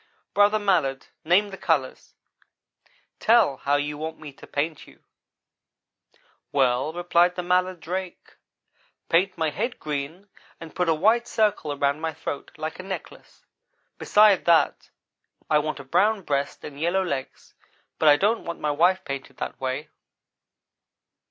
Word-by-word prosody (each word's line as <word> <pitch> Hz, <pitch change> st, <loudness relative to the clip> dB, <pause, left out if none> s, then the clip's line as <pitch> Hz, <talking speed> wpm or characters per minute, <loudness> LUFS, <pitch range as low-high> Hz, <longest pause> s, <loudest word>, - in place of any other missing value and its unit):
"'Brother 205 Hz, +1 st, +4 dB
Mallard, 180 Hz, -10 st, 0 dB, 0.2 s
name 195 Hz, +5 st, +3 dB
the 195 Hz, -, -9 dB
colors 145 Hz, -6 st, -1 dB, 1.0 s
tell 220 Hz, -, +4 dB
how 140 Hz, +2 st, 0 dB
you 145 Hz, +1 st, -2 dB
want 160 Hz, +1 st, -5 dB
me 150 Hz, -3 st, -10 dB
to -, -, -15 dB
paint 150 Hz, +1 st, -3 dB
you.' -, -, -19 dB, 1.5 s
"'Well,' 130 Hz, 0 st, +2 dB
replied 175 Hz, +1 st, +2 dB
the 180 Hz, -, -3 dB
mallard 180 Hz, 0 st, +1 dB
drake, 180 Hz, +2 st, -6 dB, 0.7 s
'paint 185 Hz, +3 st, +2 dB
my 160 Hz, -2 st, 0 dB
head 235 Hz, -, -3 dB
green, 150 Hz, +6 st, -5 dB, 0.3 s
and 165 Hz, -1 st, -10 dB
put 180 Hz, -2 st, 0 dB
a 160 Hz, -, +3 dB
white 225 Hz, +8 st, +2 dB
circle 210 Hz, -8 st, 0 dB
around 140 Hz, +1 st, 0 dB
my 160 Hz, -1 st, -2 dB
throat, 145 Hz, -2 st, -6 dB
like 155 Hz, +2 st, -5 dB
a -, -, -6 dB
necklace. 190 Hz, 0 st, -9 dB, 0.5 s
Besides 210 Hz, -2 st, +4 dB
that, 165 Hz, -4 st, +2 dB, 0.6 s
I 150 Hz, -, +5 dB
want 155 Hz, 0 st, -3 dB
a -, -, -8 dB
brown 205 Hz, +9 st, +1 dB
breast 140 Hz, -2 st, -2 dB
and 140 Hz, -1 st, -9 dB
yellow 175 Hz, +4 st, +1 dB
legs: 140 Hz, -7 st, -5 dB, 0.5 s
but 155 Hz, -, +5 dB
I 145 Hz, -, +8 dB
don't 215 Hz, +7 st, +1 dB
want 170 Hz, 0 st, -6 dB
my 150 Hz, -, -1 dB
wife 175 Hz, +5 st, +2 dB
painted 135 Hz, 0 st, -6 dB
that -, -, -6 dB
way.' 130 Hz, +3 st, -3 dB
165 Hz, 145 wpm, -25 LUFS, 145-190 Hz, 1.5 s, I